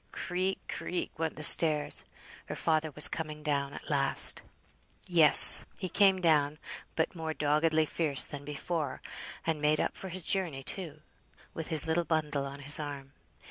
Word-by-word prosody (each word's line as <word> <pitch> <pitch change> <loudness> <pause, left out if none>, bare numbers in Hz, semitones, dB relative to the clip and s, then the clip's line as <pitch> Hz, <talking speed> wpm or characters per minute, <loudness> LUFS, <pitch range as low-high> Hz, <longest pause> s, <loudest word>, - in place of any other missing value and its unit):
Creak, 185 +1 -5
creak, 180 - -7
went 160 -1 -5
the 155 - -10
stairs. 155 -2 +3 0.4
Her - - -8
father 155 -1 -3
was 150 +1 +5
coming 155 -2 -9
down 140 -2 -4
at - - -13
last. - - +2 0.6
Yes, 165 -4 +9
he 185 - -7
came 195 -1 +1
down, 155 -4 -1 0.4
but 160 - -4
more 160 -2 -8
doggedly 155 +2 -2
fierce 150 -3 -2
than 145 -1 -11
before, 150 0 -7 0.4
and 160 -2 -4
made 150 0 -1
up - - -4
for 190 - -10
his 185 0 -6
journey, 165 -8 -3
too; 155 -2 -3 0.5
with 160 - -9
his 160 -1 0
little 165 +2 -3
bundle 150 -4 -4
on 140 +1 -12
his 145 +2 +5
arm. 140 -2 -10
155 Hz, 160 wpm, -27 LUFS, 145-165 Hz, 0.6 s, Yes